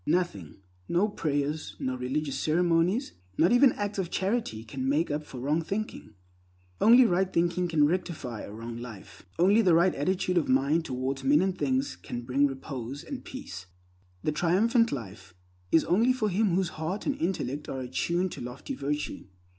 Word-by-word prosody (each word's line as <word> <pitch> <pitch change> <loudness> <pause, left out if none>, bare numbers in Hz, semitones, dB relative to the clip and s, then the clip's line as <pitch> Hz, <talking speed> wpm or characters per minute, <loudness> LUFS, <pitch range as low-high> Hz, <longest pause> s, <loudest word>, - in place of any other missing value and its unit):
Nothing, 150 - -1 0.3
no 175 +5 +3
prayers, 150 -5 -2
no 130 0 -2
religious 135 +2 -2
ceremonies, 175 - +1 0.2
not 170 - +4
even 245 +2 +6
acts 205 -1 -3
of 180 -3 -2
charity, 190 - -1
can 130 +4 -3
make 150 +3 +1
up 150 +1 -2
for 130 -4 -9
wrong 150 +6 0
thinking. 195 - -5 0.7
Only 245 +3 +8
right 190 -2 +1
thinking 175 +1 +1
can 160 -3 +3
rectify 150 - -2
a - - -8
wrong 115 +2 -7
life. 100 -5 -10
Only 195 +6 +5
the 180 -6 +4
right 175 +3 +4
attitude 180 +3 +1
of 155 - -3
mind 140 +5 +2
towards 130 +1 -3
men 145 +4 +4
and 190 -1 0
things 265 +5 0
can 120 0 -6
bring 135 +4 +2
repose 135 -1 -6
and 275 -3 -7
peace. 100 - -8 0.6
The 155 - +1
Triumphant 225 - +2
Life 95 -7 -7 0.4
is 160 - +5
only 230 +8 +3
for 220 -4 0
him 195 -1 +2
whose 185 -2 +1
heart 180 +6 -3
and 285 - 0
intellect 150 -5 -2
are 130 - -4
attuned 170 +8 -1
to - - -7
lofty 125 0 -6
virtue. 145 +1 -3
160 Hz, 170 wpm, -28 LUFS, 130-190 Hz, 0.7 s, Only